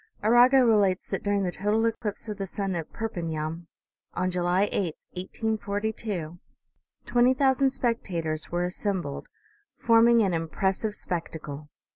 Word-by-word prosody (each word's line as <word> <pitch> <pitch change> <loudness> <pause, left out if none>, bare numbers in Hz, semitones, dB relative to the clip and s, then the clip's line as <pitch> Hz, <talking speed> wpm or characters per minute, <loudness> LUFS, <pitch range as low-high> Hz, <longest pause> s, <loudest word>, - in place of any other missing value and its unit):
Arago 245 +4 +6
relates 200 -5 +3
that - - -2
during 200 -1 0
the 180 - -1
total 210 +6 +1
eclipse 225 -1 -2
of 210 -2 -5
the 195 - -3
sun 195 +1 -3
at 165 -3 -4
Perpignan, 165 -6 -4 0.5
on 185 0 0
July 180 +2 +1
8, 175 -6 -1 0.2
1842, 205 -3 -3 0.7
twenty 245 +1 +4
thou 270 0 +4
sand 270 0 +2
spectators 175 -12 -2
were 175 +1 0
assembled, 180 -4 -3 0.5
forming 230 0 +5
an 190 -3 +1
impressive 190 +6 -1
spectacle. 155 -5 -6
195 Hz, 130 wpm, -27 LUFS, 175-225 Hz, 0.7 s, Arago